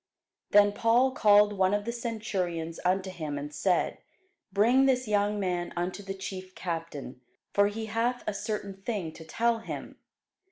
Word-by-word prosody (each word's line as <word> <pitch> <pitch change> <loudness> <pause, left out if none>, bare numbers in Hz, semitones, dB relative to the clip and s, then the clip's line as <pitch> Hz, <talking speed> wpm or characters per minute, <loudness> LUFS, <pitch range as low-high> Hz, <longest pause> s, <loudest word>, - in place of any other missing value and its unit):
Then 205 0 +6
Paul 235 +5 +3
called 210 -4 +5
one 190 0 +2
of 205 0 -2
the 235 - -1
centurions 195 -9 -3
unto 185 +1 +1
him, 155 -5 -4
and 145 +1 -6
said, 175 +6 +1 0.5
Bring 240 +7 +4
this 255 -2 +2
young 205 0 +1
man 180 -3 -1
unto 180 +3 -2
the 195 -1 -5
chief 190 -1 -7
captain: 165 -7 -5 0.3
for 200 0 +5
he 220 +2 -4
hath 230 +3 -1
a 215 - -1
certain 200 -1 -4
thing 195 -7 -3
to 160 - -11
tell 230 +7 +1
him. 225 - -7
200 Hz, 160 wpm, -29 LUFS, 180-220 Hz, 0.5 s, Then